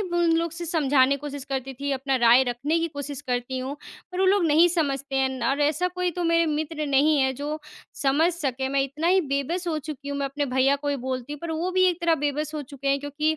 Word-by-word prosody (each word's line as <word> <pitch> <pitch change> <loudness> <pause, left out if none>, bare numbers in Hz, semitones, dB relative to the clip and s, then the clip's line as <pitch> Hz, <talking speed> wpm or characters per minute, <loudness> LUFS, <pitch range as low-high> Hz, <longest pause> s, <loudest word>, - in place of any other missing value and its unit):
उन 345 -3 +1
लोगों 335 0 0
से 345 - -5
समझाने 280 -4 +3
कोशिश 285 -1 -7
करती 270 -1 -4
थी, 280 +2 -4
अपना 270 0 0
राय 240 +1 +6
रखने 280 +7 0
की 335 0 -1
कोशिश 285 -2 -6
करती 245 +1 -2
हूँ, 265 +3 -4 0.4
पर 365 - -2
वो 380 - +4
लोग 385 -1 +4
नहीं 320 +3 +5
समझते 280 -5 -1
हैं, 265 0 +2
न 260 -2 -6
और 280 +2 -1
ऐसा 305 +5 +2
कोई 360 0 -2
तो 350 +1 -3
मेरे 335 0 +3
मित्र 310 0 -2
नहीं 285 +2 +3
है 265 0 +2
जो 295 +3 -4 0.4
समझ 295 +6 +3
सके। 265 -5 -2
मैं 275 0 +1
इतना 285 +5 -3
ही 375 +2 +5
बेबस 330 +6 -1
हो 315 - -1
चुकी 295 -2 -7
हूँ, 285 0 -3
मैं 280 - 0
अपने 285 +1 -2
भईया 270 +2 +4
को 290 +1 -5
ही 285 - 0
बोलती, 260 +3 -3
पर 335 +3 -6
वो 325 +3 -1
भी 370 0 +3
एक 355 0 -2
तरह 340 -1 +3
बेबस 300 +2 -2
हो 300 - -3
चुके 280 0 -6
हैं, 275 0 +3
क्योंकि 305 +2 -1
290 Hz, 245 wpm, -25 LUFS, 270-330 Hz, 0.4 s, राय